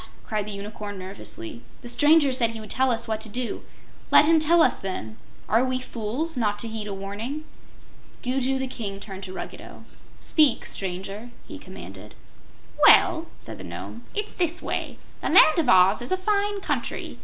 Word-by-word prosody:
cried 210 -2 -2
the - - -4
Unicorn, 205 0 -6
nervously. 115 - -8 0.2
"The - - -8
stranger 290 +2 +4
said 240 -3 +2
he 225 0 -7
would 215 -1 -9
tell 260 +2 +3
us 235 -1 -1
what 220 -1 -2
to 220 - -6
do. 245 +2 -3 0.5
Let - - +7
him 325 +1 +5
tell 325 +2 +5
us, - - +2
then. 110 - -5 0.3
Are 225 +4 +3
we 255 0 -1
fools, 255 +7 -3
not 210 -4 0
to 230 - -3
heed 220 -1 -5
a 200 - -4
warning?" 215 +10 -5 0.8
Gugu 265 +1 0
the 265 - -2
King 210 -6 -5
turned 195 -2 -8
to 185 - -8
Ruggedo. - - -9 0.4
"Speak, 300 -6 +3
Stranger," 195 +4 -5 0.2
he - - -9
commanded. - - -11 0.7
"Well," 335 -3 +6
said - - -10
the - - -8
Nome, 235 - -8
"it's 420 0 -3
this 345 -1 +3
way: - - -4 0.2
The - - -1
Land 315 +2 +7
of 300 -7 +1
Oz 185 +4 +5
is 245 - -4
a 375 - +2
fine 405 +1 0
country. - - -3
235 Hz, 180 wpm, -25 LUFS, 205-300 Hz, 0.8 s, Let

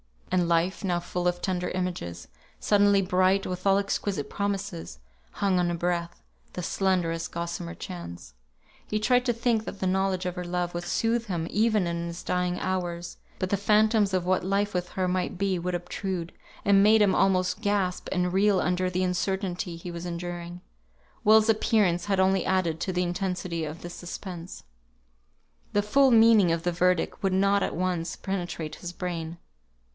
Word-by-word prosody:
And 180 -2 +2
Life, 170 +4 +1
now 180 -3 +1
full 180 0 -2
of 175 0 -1
tender 180 -2 -1
images, 130 - -4 0.3
suddenly 205 -1 +4
bright 185 +1 +2
with 185 +1 -3
all 195 0 +5
exquisite 200 -5 -2
promises, 200 - -3 0.4
hung 195 -2 +1
on 175 -1 +1
a 175 - -1
breath, 170 0 -2 0.3
the 180 - -5
slenderest 170 -3 0
gossamer 170 0 -4
chance. 85 - -8 0.5
He 210 - -1
tried 250 +3 +3
to 240 - +2
think 230 -1 0
that 200 - -7
the 190 - -1
knowledge 190 0 0
of 180 -1 -2
her 180 -1 -4
love 175 0 -2
would 175 0 -4
soothe 230 +5 0
him 170 -4 -2
even 215 -2 +2
in 170 0 -2
his 170 +1 -7
dying 180 0 0
hours; 175 -2 -3 0.2
but 185 - -2
the 200 - +3
phantoms 210 0 +3
of 185 -2 +1
what 185 0 +1
life 200 +2 0
with 180 -1 -2
her 185 -1 -1
might 180 0 -1
be, 195 -1 0
would 180 +1 -2
obtrude, 175 0 -4 0.3
and 200 -1 +5
made 215 +2 +6
him 200 -2 +4
almost 190 +1 +2
gasp 200 -4 0
and 180 -1 0
reel 195 0 +3
under 180 +1 0
the 185 +1 -1
uncertainty 185 -1 -2
he 170 +1 -7
was 170 0 -6
enduring. 175 0 -5 0.6
Will's 220 +1 +6
appearance 205 -5 +2
had 195 -2 +2
only 190 0 +3
added 180 -4 +1
to 185 - -2
the 180 0 +1
intensity 180 -2 -2
of 155 +2 -7
this 175 0 -7
suspense. 175 0 -8 1.1
The 205 - +2
full 270 +6 +4
meaning 225 -6 +6
of 165 0 -1
the 175 - +1
verdict 180 0 +1
could 195 -1 +1
not 200 +1 +3
at - - -1
once 180 -1 -1
penetrate 175 -5 -4
his 175 -1 -7
brain. 170 -2 -4
180 Hz, 175 wpm, -27 LUFS, 175-195 Hz, 1.1 s, made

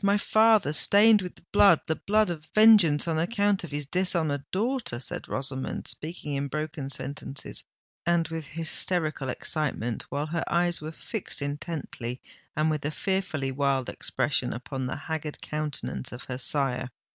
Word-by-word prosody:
my 200 +1 +4
father—stained 215 0 +5
with 180 -1 -10
blood—the 195 -6 +5
blood 210 0 +2
of 155 -3 -6
vengeance 210 -9 +6
on 160 -1 0
account 200 +2 +1
of 170 - -6
his 145 0 -3
dishonoured 160 -3 0
daughter;" 225 - -1
said 125 - -4
Rosamond, 130 0 -3
speaking 155 -2 -5
in 140 0 -1
broken 150 -1 -4
sentences 135 +1 -5 0.4
and 170 -1 +2
with 160 -2 -5
hysterical 155 -2 +1
excitement, 130 -4 -1
while 145 +1 -2
her 160 +1 -2
eyes 175 -1 +1
were 155 +1 -5
fixed 210 +5 -4
intently 145 -4 -4 0.4
and 155 +1 +2
with 155 -2 -2
a 145 - 0
fearfully 160 -5 -2
wild 135 -1 0
expression - - -1
upon 130 +1 -4
the - - -3
haggard 155 -2 -4
countenance 150 -3 -2
of 120 - -8
her 125 -1 -5
sire. 130 -2 +2
155 Hz, 145 wpm, -27 LUFS, 140-180 Hz, 0.4 s, vengeance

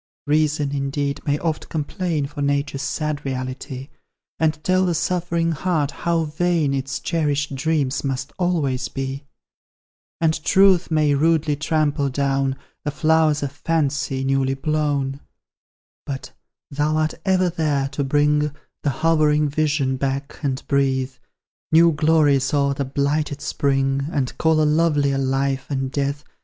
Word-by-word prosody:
Reason, 150 -1 +1
indeed, 140 0 -2
may 145 0 +2
oft 160 0 -3
complain 160 0 -2
For 145 +1 -7
Nature's 140 -1 0
sad 150 +1 -2
reality, 130 +1 -5 0.5
And 160 0 +2
tell 185 0 +3
the 175 - +1
suffering 170 0 0
heart 155 -3 0
how 170 -1 0
vain 160 -1 0
Its 135 0 -2
cherished 145 -4 -1
dreams 145 -1 0
must 135 -1 -3
always 150 -8 0
be; 135 +1 -5 0.9
And 160 -1 +1
Truth 190 0 +4
may 155 -2 +3
rudely 155 +1 +2
trample 150 -1 0
down 135 0 0 0.3
The 150 - -1
flowers 155 0 +2
of 140 - -2
Fancy, 140 -3 -1
newly 135 0 +1
blown: 145 -2 -1 0.9
But 130 -2 -5 0.4
thou 150 +2 0
art 155 0 +1
ever 185 -2 +2
there, 150 -5 0
to 140 +1 -2
bring 150 +1 +2 0.3
The 145 - 0 0.2
hovering 150 -2 +3
vision 145 -3 0
back, 140 +1 -3
and 135 -3 -2
breathe 135 -2 +1 0.6
New 165 +1 +6
glories 150 -2 +3
o'er 140 -1 +2
the 140 0 -2
blighted 145 +2 -1
spring, 135 -2 0
And 135 -6 -1
call 160 -1 +3
a - - +3
lovelier 150 -3 +2
Life 135 0 0
from 135 -2 -2
Death. 140 +1 -2
145 Hz, 135 wpm, -22 LUFS, 135-155 Hz, 0.9 s, New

